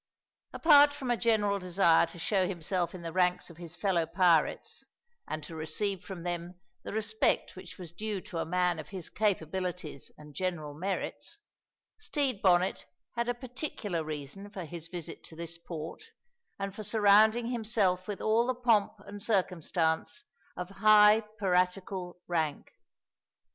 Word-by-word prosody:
Apart 290 Hz, -2 st, +6 dB
from 270 Hz, -4 st, -3 dB
a -, -, +3 dB
general 210 Hz, -4 st, +2 dB
desire 175 Hz, -2 st, +4 dB
to 170 Hz, -, -12 dB
show 185 Hz, +2 st, +1 dB
himself 175 Hz, 0 st, -1 dB
in 175 Hz, -, -9 dB
the 165 Hz, -, -4 dB
ranks 180 Hz, 0 st, +1 dB
of 165 Hz, -, -15 dB
his 170 Hz, -1 st, -7 dB
fellow 175 Hz, -4 st, +1 dB
pirates 170 Hz, -2 st, +2 dB, 0.4 s
and 155 Hz, 0 st, -4 dB
to 160 Hz, +2 st, -8 dB
receive 185 Hz, +5 st, -2 dB
from 180 Hz, -2 st, -7 dB
them 175 Hz, 0 st, -4 dB, 0.2 s
the -, -, -7 dB
respect 220 Hz, 0 st, 0 dB
which 185 Hz, -1 st, -10 dB
was 175 Hz, -3 st, -8 dB
due 210 Hz, +2 st, -3 dB
to 175 Hz, -2 st, -6 dB
a -, -, +1 dB
man 180 Hz, -1 st, +1 dB
of 155 Hz, -, -8 dB
his 185 Hz, -4 st, -7 dB
capabilities 180 Hz, -6 st, -2 dB
and 150 Hz, -1 st, -13 dB
general 170 Hz, -4 st, -3 dB
merits, 190 Hz, -, -4 dB, 0.6 s
Stede 280 Hz, -, -1 dB
Bonnet 185 Hz, 0 st, +3 dB, 0.3 s
had 235 Hz, 0 st, -1 dB
a 245 Hz, -, 0 dB
particular 240 Hz, -, -4 dB
reason 155 Hz, +6 st, -6 dB
for 190 Hz, -4 st, -6 dB
his 165 Hz, 0 st, -7 dB
visit 170 Hz, -2 st, -7 dB
to 160 Hz, -, -12 dB
this 165 Hz, 0 st, -6 dB
port 165 Hz, -, -7 dB, 0.6 s
and 195 Hz, -1 st, -4 dB
for 215 Hz, -, -7 dB
surrounding 220 Hz, +2 st, +4 dB
himself 215 Hz, -6 st, 0 dB
with 205 Hz, -2 st, -4 dB
all 225 Hz, +2 st, +3 dB
the 255 Hz, -, 0 dB
pomp 230 Hz, -5 st, +3 dB
and 205 Hz, 0 st, -8 dB
circumstance 180 Hz, -, 0 dB, 0.3 s
of 180 Hz, 0 st, -4 dB
high 210 Hz, +1 st, +6 dB, 0.2 s
piratical 185 Hz, -1 st, 0 dB
rank. 160 Hz, -4 st, -1 dB
185 Hz, 155 wpm, -30 LUFS, 170-215 Hz, 0.6 s, Apart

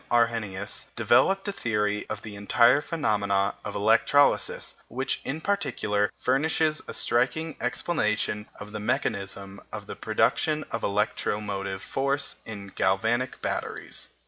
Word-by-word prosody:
Arrhenius, 115 Hz, -5 st, 0 dB
developed 195 Hz, +1 st, +3 dB
a -, -, +1 dB
theory 105 Hz, -, -1 dB
of 110 Hz, -1 st, -5 dB
the 105 Hz, -2 st, -8 dB
entire 120 Hz, +6 st, +4 dB
phenomena 100 Hz, -11 st, +1 dB
of -, -, -5 dB
electrolysis, -, -, +3 dB
which, 130 Hz, +3 st, -2 dB
in 145 Hz, +4 st, -3 dB
particular, 105 Hz, -, 0 dB
furnishes 155 Hz, +3 st, +2 dB
a -, -, -5 dB
striking 145 Hz, +7 st, +1 dB
explanation 105 Hz, -6 st, 0 dB
of 105 Hz, 0 st, -8 dB
the 105 Hz, -, -5 dB
mechanism 100 Hz, -1 st, -2 dB
of -, -, -6 dB
the -, -, -7 dB
production 155 Hz, -1 st, +1 dB
of 115 Hz, -, -2 dB
electromotive 100 Hz, -1 st, -1 dB
force 140 Hz, +1 st, 0 dB
in 100 Hz, -2 st, -7 dB
galvanic 110 Hz, +7 st, 0 dB
batteries. -, -, -3 dB
110 Hz, 120 wpm, -27 LUFS, 100-135 Hz, -, entire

